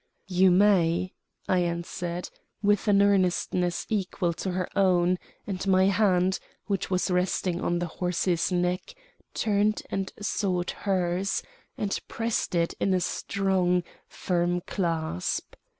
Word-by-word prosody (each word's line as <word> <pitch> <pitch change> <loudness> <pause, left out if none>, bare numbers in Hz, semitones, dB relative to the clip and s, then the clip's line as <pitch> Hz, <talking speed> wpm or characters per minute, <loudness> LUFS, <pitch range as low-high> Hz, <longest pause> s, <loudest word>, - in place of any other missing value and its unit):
"You 185 +1 +5
may," 185 -2 +3 0.3
I 185 - +3
answered, 170 0 -3 0.3
with 205 +1 +2
an 200 -1 +5
earnestness 180 -2 +1
equal 185 -4 -1
to 190 - -4
her 180 0 -1
own, 180 -2 +3 0.3
and 195 -1 -4
my 190 0 +5
hand, 190 -2 +2 0.3
which 200 -3 -2
was 185 0 0
resting 180 0 0
on 175 - 0
the 175 - -1
horse's 180 +1 0
neck, 180 - -1 0.4
turned 210 0 +1
and 195 -1 -2
sought 185 -3 -1
hers, 185 0 -1 0.3
and 200 -1 -1
pressed 225 -4 -2
it 170 0 +1
in 190 - +2
a - - +2
strong, 180 -1 0 0.2
firm 175 0 -1
clasp. 165 - -2
185 Hz, 125 wpm, -27 LUFS, 175-195 Hz, 0.4 s, You